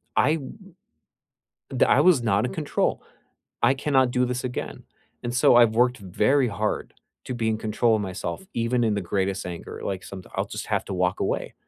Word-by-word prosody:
I 155 - +4
w 135 -5 -7 1.2
d - - +5
I - - +4
was 175 -9 +5
not 100 -1 +2
in - - -5
control. 155 -5 -1 0.6
I 135 - +5
cannot 135 -2 +2
do 125 0 +2
this 125 0 -3
again." 125 -1 -5 0.4
And 120 - -3
so 120 - +5
I've 115 -2 +5
worked 125 0 +2
very 105 +8 +2
hard 105 +1 -2 0.3
to 130 - -4
be 115 -1 -1
in 110 - 0
control 110 +1 +1
of 105 - -1
myself, 100 - -5
even 120 +1 0
in 110 -2 +1
the 100 - -1
greatest 95 -1 0
anger, 85 -2 -7
like, 95 -2 -3
someti 95 -2 -9
I'll - - 0
just - - -5
have - - 0
to - - -5
walk 90 +1 0
away. - - -2
115 Hz, 195 wpm, -25 LUFS, 100-125 Hz, 1.2 s, d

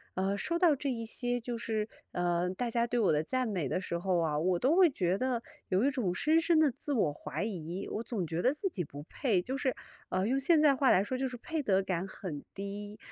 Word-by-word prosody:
呃， 190 +2 0
说 335 +12 -1
到 340 -4 +5
这 280 +1 -3
一 230 -3 -3
些 245 +2 -1
就 240 +1 -4
是， 220 -2 -2 0.3
呃， 175 0 +1
大 230 +6 -2
家 235 0 +1
对 240 0 0
我 205 - +4
的 150 0 +2
赞 255 +8 -1
美 180 - -2
的 - - 0
时 170 -2 -3
候 185 0 +1
啊， 155 -3 0
我 180 +2 +2
都 275 - +3
会 365 -3 +7
觉 185 -9 0
得 245 +2 -1 0.3
有 185 +4 +2
一 280 - +3
种 235 -10 -1
深 310 - +3
深 330 -1 +3
地 300 -4 +4
自 285 +3 -4
我 180 - +2
怀 150 - -4
疑， 185 -3 -4
我 215 - -2
总 220 -7 -3
觉 165 +1 -2
得 250 - +4
自 385 +6 -2
己 190 - -3
不 145 -1 -9
配， 205 - 0
就 255 +8 -4
是， 265 -2 0 0.3
呃， 185 +1 0
用 265 +3 +2
现 315 +4 +4
在 290 -3 +5
话 265 0 +3
来 190 - +5
说 255 +4 -3
就 265 - 0
是 250 - -6
配 320 +6 -3
得 195 -7 +2
感 185 -1 -2
很 175 -6 -6
低。 205 +1 -6
220 Hz, 270 characters per minute, -31 LUFS, 180-260 Hz, 0.3 s, 会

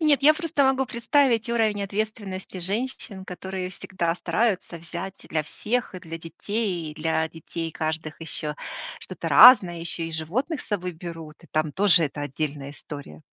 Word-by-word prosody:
Нет, 300 -3 +4
я 300 +2 +8
просто 310 -3 0
могу 265 0 +3
представить 235 -1 +2
уровень 220 -3 +1
ответственности 200 -2 -4
женщин, 200 0 -2
которые 185 0 -5
всегда 175 -2 -2
стараются 205 -3 0
взять 170 +3 -7
для 155 -1 0
всех, 225 +9 -2
и - - -4
для 165 -2 -7
детей 175 0 -3
и - - -16
для 160 +1 0
детей 165 +1 -5
каждых 155 0 -3
ещё 155 -2 -2 0.5
что-то - - -5
разное, 185 -9 +9
ещё 170 0 -4
и 165 - -5
животных 250 - -2
с - - -13
собой 180 -4 -2
берут. 165 -2 -8
И - - -15
там 155 -1 0
тоже 180 -3 +5
это 145 0 -4
отдельная 145 0 -3
история. 145 - -9
180 Hz, 160 wpm, -25 LUFS, 160-220 Hz, 0.5 s, разное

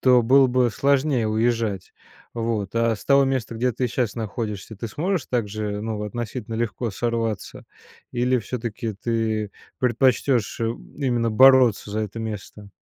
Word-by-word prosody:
то 125 -1 +5
было 135 +3 +6
бы 125 -1 +2
сложнее 140 -1 +1
уезжать. 110 -3 -1 0.4
Вот. 115 -4 -2
А 115 0 +2
с 105 - -11
того 140 0 +5
места, 130 -4 -2
где 125 +2 0
ты 125 +3 -1
щас 120 -2 -1
находишься, 110 -1 -5
ты 115 - -5
сможешь 170 - -1
также, 105 -3 -2
ну, 110 -1 -3
относительно 115 0 -5
легко 115 0 -2
сорваться 115 0 -3 0.5
или 125 +1 +2
все-таки 115 -1 -4
ты 110 -1 -1 0.3
предпочтёшь, 125 -1 +1
э, - - +1 0.3
именно 120 -5 0
бороться 130 -3 +5
за 105 +1 -2
это 110 +1 -4
место? 105 -2 -7
115 Hz, 145 wpm, -23 LUFS, 110-125 Hz, 0.5 s, было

